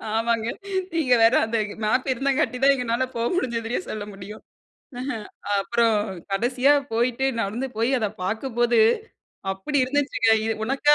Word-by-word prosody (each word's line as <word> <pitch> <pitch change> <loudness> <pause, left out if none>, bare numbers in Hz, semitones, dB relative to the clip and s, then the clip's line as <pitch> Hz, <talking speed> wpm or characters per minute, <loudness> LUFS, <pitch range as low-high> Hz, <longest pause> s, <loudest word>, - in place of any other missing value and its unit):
ஆமாங்க. 230 0 0 0.5
நீங்க 290 -7 +2
வேற 230 +3 +6
அந்த 230 +1 -1 0.3
மேப் 255 +5 +1
இருந்தாங்காட்டி 270 +1 0
தான் 280 0 +7
எங்கனால 250 0 0
போக 230 0 -1
முடிஞ்சதுன்னே 235 -7 -1
சொல்ல 215 -1 -4
முடியும். 200 +2 -10 0.6
அஹ் 250 -5 -4 0.3
அப்புறம் 230 +1 +2 0.3
கடைசியா 255 +7 +3 0.2
போயிட்டு 245 +3 +1 0.2
நடந்து 230 +7 -2
போயி 230 +4 +1
அதை 215 -2 0
பார்க்கும்போது, 235 +3 +1 0.7
அப்டி 235 +10 -2
இருந்துச்சுங்க. 280 -3 0 0.4
உனக்கா 275 +4 +3
235 Hz, 125 wpm, -24 LUFS, 225-265 Hz, 0.7 s, தான்